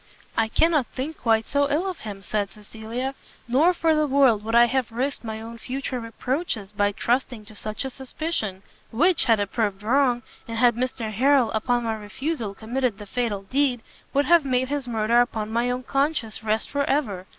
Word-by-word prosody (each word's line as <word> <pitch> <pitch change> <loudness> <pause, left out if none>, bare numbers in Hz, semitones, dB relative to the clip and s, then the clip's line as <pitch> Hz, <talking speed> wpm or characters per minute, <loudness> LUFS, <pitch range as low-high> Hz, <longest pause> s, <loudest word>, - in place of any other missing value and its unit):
"I 225 - +2
cannot 305 +2 +2
think 290 +5 -5
quite 225 -1 +2
so 285 0 +1
ill 315 +7 +1
of 370 -3 -4
him," 200 -3 -8
said 205 +1 -2
Cecilia, 225 +5 -5 0.3
"nor 280 +9 +4
for 330 -2 +2
the 305 -1 +2
world 265 -6 +4
would 225 +1 -1
I 235 0 +8
have 250 0 -1
risked 260 +5 -2
my 220 -1 -5
own 230 +1 -9
future 260 +1 -4
reproaches 230 - -3
by 205 -1 +1
trusting 240 0 -1
to 215 - -14
such 215 +5 -4
a 265 - -4
suspicion, 255 - -3 0.3
which, 325 +8 +3
had 225 -4 +4
it 205 -1 -2
proved 210 -3 -1
wrong, 245 +1 +2 0.2
and 230 0 -4
had 240 0 +5
Mr 240 -3 -2
Harrel, 260 +1 +3
upon 240 +2 0
my 225 -1 -1
refusal 220 +1 -4
committed 240 0 -1
the 210 - -9
fatal 205 -2 -2
deed, 255 +2 +1 0.3
would 280 +1 +2
have 340 -2 +5
made 260 -1 0
his 285 -3 -2
murder 230 +1 +3
upon 220 -3 -2
my 235 +1 +1
own 250 +1 -2
conscience 275 -6 -1
rest 215 0 0
for 285 0 +1
ever! 205 -10 -1
240 Hz, 195 wpm, -24 LUFS, 220-275 Hz, 0.3 s, I